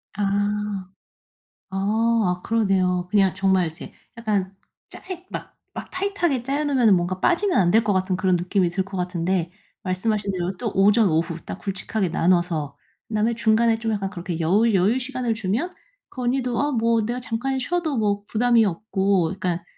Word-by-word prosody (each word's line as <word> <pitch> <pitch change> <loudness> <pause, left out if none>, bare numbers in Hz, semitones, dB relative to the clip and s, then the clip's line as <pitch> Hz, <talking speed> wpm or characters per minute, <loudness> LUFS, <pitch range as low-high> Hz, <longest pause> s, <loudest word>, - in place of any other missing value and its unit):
아. 205 - -1 1.5
아. 190 - -5 0.6
아 - - -18
그러네요. 190 -5 +1
그냥 195 -2 +3
정말 190 -2 +2
이제 160 +3 -8 0.2
약간 205 -4 -1 0.3
짜이 370 -1 -8
막 - - -7 0.2
막 - - -6
타이트하게 370 -9 -1
짜여 280 +3 -1
놓으면은 250 -8 +4
뭔가 180 +1 -1
빠지면 350 - +2
안 175 -3 +4
될 225 +2 +5
것 210 -2 +1
같은 185 0 0
그런 185 -1 +2
느낌이 180 +1 0
들 190 +2 -1
것 195 0 -8
같은데 180 -1 -1 0.3
말씀하신 200 +2 -1
대로 185 0 -3
또 225 +3 -3
오전, 205 +2 +4
오후 165 +1 0
딱 - - -6
굵직하게 195 0 -2
나눠서 170 -5 +1 0.3
그다음에 220 +1 +1
중간에 225 0 +2
좀 225 -1 -1
약간 200 -2 -2
그렇게 175 -3 -5
여우 200 +8 +3
여유 200 +6 +2
시간을 255 -2 -2
주면 225 - -2 0.4
그 255 - -7
언니도 245 -1 0
'아 290 +1 +1
뭐 230 -3 +2
내가 240 +3 -2
잠깐 250 +2 -2
쉬어도 320 +1 -1
뭐 205 -2 0
부담이 235 0 +3
없고.' 195 -1 +1 0.2
그러니까 175 -2 -2
205 Hz, 345 characters per minute, -23 LUFS, 185-235 Hz, 1.5 s, 될